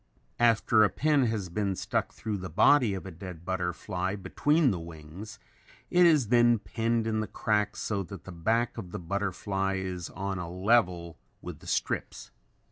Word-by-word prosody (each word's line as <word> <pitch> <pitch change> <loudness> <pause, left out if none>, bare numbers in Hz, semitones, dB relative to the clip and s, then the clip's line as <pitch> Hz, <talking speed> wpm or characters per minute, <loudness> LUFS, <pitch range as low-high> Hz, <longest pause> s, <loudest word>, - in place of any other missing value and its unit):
After 115 -2 +4
a 105 - +4
pin 145 - +2
has 105 -5 -2
been 100 +1 -1
stuck - - -2
through 110 -2 -4
the 90 -1 -6
body 110 - +4
of 95 - -7
a 95 - -7
dead 85 -1 -9
butterfly 90 +1 -2
between 145 - +2
the 90 - -3
wings, 85 +5 -10 0.5
it 180 0 +6
is 150 -10 +3
then 120 -1 +5
pinned 115 +2 -1
in 110 -1 0
the 110 - -2
crack 105 -1 0
so 100 -2 -2
that 95 -1 -9
the 95 - -9
back 110 +8 0
of 90 -5 -9
the - - -4
butterfly 95 +1 -2
is 95 -3 -4
on 95 +1 -4
a 85 -1 -5
level 90 -3 +1 0.2
with - - -7
the - - -14
strips. - - -2
100 Hz, 175 wpm, -29 LUFS, 90-115 Hz, 0.5 s, it